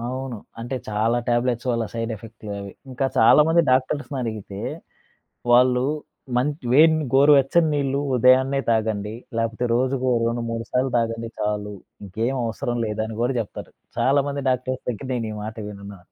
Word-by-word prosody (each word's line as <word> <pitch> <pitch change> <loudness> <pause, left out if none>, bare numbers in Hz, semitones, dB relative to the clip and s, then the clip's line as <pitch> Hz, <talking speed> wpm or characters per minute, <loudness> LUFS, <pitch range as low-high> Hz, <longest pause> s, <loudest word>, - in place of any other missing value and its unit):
అవును. 130 +1 -4 0.2
అంటే, 120 +3 -4
చాలా 110 +3 +1
టాబ్లెట్స్ 120 0 0
వల్ల 115 -1 0
సైడ్ 115 0 -2
ఎఫెక్ట్‌లే 110 -1 -10
అవి. 100 0 -7 0.2
ఇంకా 130 +2 -1
చాలామంది 155 +8 +6
డాక్టర్స్‌నడిగితే, 130 -6 -1 0.9
వాళ్ళు 125 +1 +5 0.5
మంచ్ 145 +4 0
వేడిని 155 +2 +5
గోరువెచ్చని 145 +3 +5
నీళ్లు 140 -1 0 0.2
ఉదయాన్నే 130 +3 +4
తాగండి, 110 -2 0 0.2
లేపోతే 115 +1 -1
రోజుకో 130 +1 +1
రెండు 115 0 -1
మూడు 115 0 -3
సార్లు 130 +1 0
తాగండి 115 0 -2
చాలు, 105 0 -2 0.3
ఇంకేం 110 +7 -2
అవసరం 120 +2 -3
లేదని 110 +1 -3
గూడా 125 +3 +1
జెప్తరు. 110 - -7 0.3
చాలామంది 140 +1 +1
డాక్టర్స్ 130 0 -2
దగ్గర 125 +3 -6
నేనీ 115 -3 -2
మాట 110 +1 -6
విన్నా. 100 -1 -9
120 Hz, 135 wpm, -23 LUFS, 110-135 Hz, 0.9 s, చాలామంది